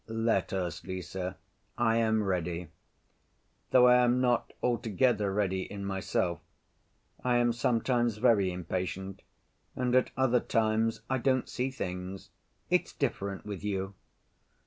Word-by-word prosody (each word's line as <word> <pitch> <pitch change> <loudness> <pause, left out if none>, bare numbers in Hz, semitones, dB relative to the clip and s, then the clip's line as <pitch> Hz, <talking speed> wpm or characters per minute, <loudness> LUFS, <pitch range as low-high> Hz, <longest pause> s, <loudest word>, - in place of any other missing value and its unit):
"Let 115 0 0
us, 90 -4 -3
Lise; 95 0 -6 0.6
I 115 0 +3
am 110 -1 +2
ready. 90 -3 -2 1.0
Though 125 -1 +6
I 125 0 +7
am 125 0 +3
not 125 -2 +1
altogether 115 -2 +1
ready 95 -2 0
in 100 +1 -6
myself. 95 -2 -1 0.8
I 125 -1 +3
am 120 -1 +3
sometimes 120 -1 +1
very 105 -5 +3
impatient 90 +2 -4 0.5
and 125 -1 0
at 130 - +4
other 130 -2 +3
times 110 0 +1
I 130 0 0
don't 130 0 +1
see 125 +2 -2
things. 95 -6 -6 0.4
It's - - +2
different 100 0 -3
with 100 -2 -6
you." 95 -1 -2
110 Hz, 125 wpm, -30 LUFS, 95-120 Hz, 1.0 s, I